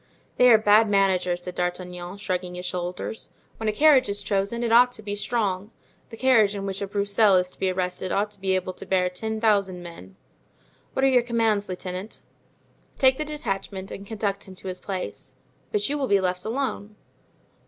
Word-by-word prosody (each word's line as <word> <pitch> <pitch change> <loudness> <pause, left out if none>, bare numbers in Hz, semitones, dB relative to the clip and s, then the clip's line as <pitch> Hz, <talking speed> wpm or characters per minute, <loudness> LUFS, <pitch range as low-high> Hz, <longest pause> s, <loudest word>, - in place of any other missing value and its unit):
"They 250 - +6
are 225 - +8
bad 215 0 +5
managers," 185 -3 +2
said 180 - -5
D'Artagnan, 180 +1 -4
shrugging 180 -3 -3
his 180 0 -6
shoulders. 180 +4 -5 0.2
"When 220 -1 -1
a - - +2
carriage 270 +1 +5
is 200 0 -3
chosen, 200 +4 -1
it 230 - 0
ought 245 +2 +6
to 215 - -7
be 205 -1 -4
strong. 205 -2 -1 0.4
The 225 - -10
carriage 220 -6 +4
in 195 -1 -4
which 195 0 -3
a 200 - -2
Broussel 200 0 +3
is 180 0 +2
to - - -14
be 190 - +1
arrested 185 0 -2
ought 205 +1 0
to 200 -2 -9
be 190 -1 +1
able 185 0 -2
to - - -10
bear 180 -1 +1
ten 220 +4 -4
thousand 200 -5 +1
men." 95 - -11 0.8
"What 265 - +2
are - - +6
your 255 -2 +5
commands, 225 -4 0
lieutenant?" 185 +2 -6 0.7
"Take 260 0 +4
the 305 - -1
detachment 195 -9 -4
and 200 0 -8
conduct 200 -2 -3
him 190 - -12
to 185 +1 -7
his 180 0 -5
place." 135 - -6 0.4
"But 205 0 0
you 290 +1 -2
will 270 - 0
be 200 -3 +4
left 180 -1 -2
alone?" 220 -3 -3
200 Hz, 195 wpm, -25 LUFS, 185-220 Hz, 0.8 s, are